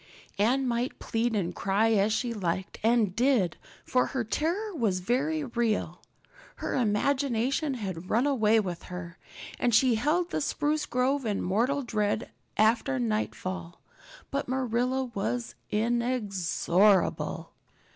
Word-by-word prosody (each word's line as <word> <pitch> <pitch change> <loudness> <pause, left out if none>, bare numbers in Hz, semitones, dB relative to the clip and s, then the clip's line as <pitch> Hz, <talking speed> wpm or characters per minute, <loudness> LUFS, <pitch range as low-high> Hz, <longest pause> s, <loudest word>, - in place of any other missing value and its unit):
Anne 255 +6 +2
might 240 +2 -1
plead 230 0 -1
and 180 -4 -1
cry 200 +5 +1
as 210 0 +3
she 235 +2 0
liked 185 -2 -3
and 225 -4 +2
did, 235 - +2 0.3
for 250 - +2
her 260 -3 -2
terror 345 - -1
was 220 - 0
very 275 - 0
real. 235 -4 -1 0.5
Her - - -4
imagination 265 +4 +1
had 185 -6 -5
run 235 +5 +2
away 225 -6 +3
with 180 -5 -3
her 180 -1 -8 0.4
and 240 -3 +2
she 250 +2 +5
held 310 +10 +1
the - - -1
spruce 300 +1 0
grove 265 +3 +1
in 210 -4 -1
mortal 245 +10 +1
dread 215 -1 -1 0.3
after 215 - +3
nightfall. 120 - -3 0.5
But 280 0 -2
Marilla 255 0 0
was 120 - -2 0.2
inexorable. 210 -5 +1
225 Hz, 125 wpm, -28 LUFS, 195-260 Hz, 0.5 s, she